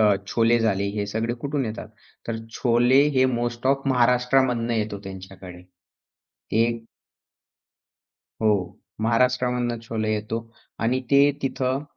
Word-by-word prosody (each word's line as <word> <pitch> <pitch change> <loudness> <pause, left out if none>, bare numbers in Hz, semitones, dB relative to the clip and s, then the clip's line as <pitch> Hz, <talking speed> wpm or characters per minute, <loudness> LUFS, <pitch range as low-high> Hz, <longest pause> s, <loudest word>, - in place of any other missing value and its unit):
अ, 105 -2 +5
छोले 115 +3 +3
झाले 100 -3 +1
हे 100 -1 -1
सगळे 110 +3 -2
कुठून 140 -1 -1
येतात?" 110 -1 -6 0.4
तर 115 - -1 0.2
छोले 125 +2 +4
हे 130 - +5 0.2
मोस्ट 120 +1 -3
ऑफ 135 0 +2
महाराष्ट्रामधून 125 -1 +2
येतो 105 -3 -1
त्यांच्याकडे. 95 -2 -10 1.0
एक 115 -1 -2 1.6
हो, 100 -4 0 0.2
महाराष्ट्रामधून 125 0 +1
छोले 110 -1 -2
येतो 110 +2 -3 0.4
आणि 125 +3 +1
ते 140 +1 +6
तिथं, 135 0 -1
115 Hz, 115 wpm, -24 LUFS, 110-125 Hz, 1.6 s, ते